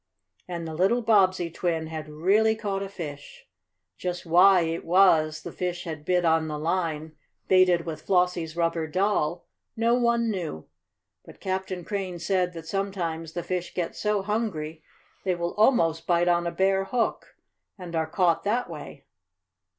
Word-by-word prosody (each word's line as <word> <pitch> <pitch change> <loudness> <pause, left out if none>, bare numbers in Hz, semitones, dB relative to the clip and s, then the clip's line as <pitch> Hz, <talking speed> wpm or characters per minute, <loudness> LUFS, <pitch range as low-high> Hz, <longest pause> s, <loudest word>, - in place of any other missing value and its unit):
And 170 -2 -5
the 160 - -6
little 195 +9 +2
Bobbsey 185 -6 +3
twin 165 -1 -1
had 155 -1 -6
really 200 +9 +2
caught 200 -3 -3
a 195 - -4
fish. 145 -6 -8 0.5
Just 180 -1 -4
why 180 +3 +6
it 165 0 -2
was 165 -4 +4
the - - -6
fish 180 -1 -3
had 155 -3 -7
bit 180 -1 +2
on 160 -1 +3
the 150 -1 -4
line 160 -1 -2 0.3
baited 180 -2 +4
with 160 -2 -5
Flossie's 180 -3 +1
rubber 165 -1 0
doll, 180 -2 0 0.3
no 230 +1 +3
one 235 -2 +2
knew. 165 - -5 0.6
But - - -15
Captain 190 -2 -3
Crane 190 -2 -3
said 180 +1 0
that 165 -2 -8
sometimes 170 -4 -3
the 175 - -3
fish 180 0 -4
get 175 -2 -2
so 210 -2 0
hungry 185 -8 -3 0.4
they 185 -2 +1
will 170 0 -3
almost 165 -8 +2
bite 175 0 +3
on 175 0 +2
a - - -1
bare 190 +2 +1
hook, 235 +2 -2 0.4
and 175 -3 -7
are 160 -1 0
caught 175 -2 +2
that 230 +5 0
way. - - -9
175 Hz, 160 wpm, -26 LUFS, 165-195 Hz, 0.6 s, why